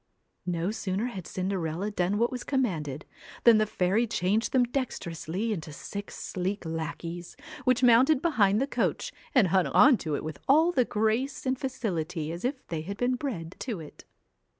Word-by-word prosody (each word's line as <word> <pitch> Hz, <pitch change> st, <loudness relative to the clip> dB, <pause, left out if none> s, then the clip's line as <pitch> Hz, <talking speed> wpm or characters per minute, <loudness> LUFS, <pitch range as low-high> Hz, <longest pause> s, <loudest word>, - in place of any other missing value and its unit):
No 175 Hz, +2 st, 0 dB
sooner 205 Hz, 0 st, -2 dB
had 195 Hz, -9 st, -5 dB
Cinderella 185 Hz, 0 st, -2 dB
done 190 Hz, 0 st, 0 dB
what 235 Hz, +2 st, +2 dB
was 250 Hz, -1 st, -4 dB
com 265 Hz, -2 st, +1 dB
manded, 150 Hz, -, -3 dB, 0.4 s
than 230 Hz, -2 st, +7 dB
the 215 Hz, -, +2 dB
fairy 200 Hz, +5 st, +1 dB
changed 210 Hz, +3 st, 0 dB
them 255 Hz, -2 st, +4 dB
dexterously 220 Hz, -, -3 dB
into 160 Hz, -5 st, -6 dB
six 200 Hz, +7 st, -7 dB
sleek 190 Hz, +1 st, -3 dB
lackeys, 165 Hz, +2 st, -5 dB, 0.3 s
which 255 Hz, 0 st, +3 dB
mounted 250 Hz, +5 st, +6 dB
behind 215 Hz, -, +3 dB
the 270 Hz, -, +2 dB
coach 280 Hz, -, -1 dB, 0.2 s
and 215 Hz, -9 st, +5 dB
hung 185 Hz, 0 st, +3 dB
on 265 Hz, -2 st, +6 dB
to 155 Hz, -6 st, -2 dB
it -, -, -4 dB
with 155 Hz, -2 st, -6 dB
all 315 Hz, +5 st, +5 dB
the 255 Hz, -7 st, +2 dB
grace 220 Hz, +8 st, 0 dB
and 260 Hz, 0 st, 0 dB
facility 175 Hz, -, -3 dB
as 170 Hz, +2 st, -6 dB
if 260 Hz, +2 st, -2 dB
they 160 Hz, -2 st, -2 dB
had 200 Hz, +5 st, -6 dB
been 245 Hz, +1 st, +1 dB
bred 215 Hz, -, -4 dB
to 230 Hz, -8 st, -4 dB
it. 155 Hz, -2 st, -11 dB
205 Hz, 175 wpm, -28 LUFS, 170-245 Hz, 0.4 s, than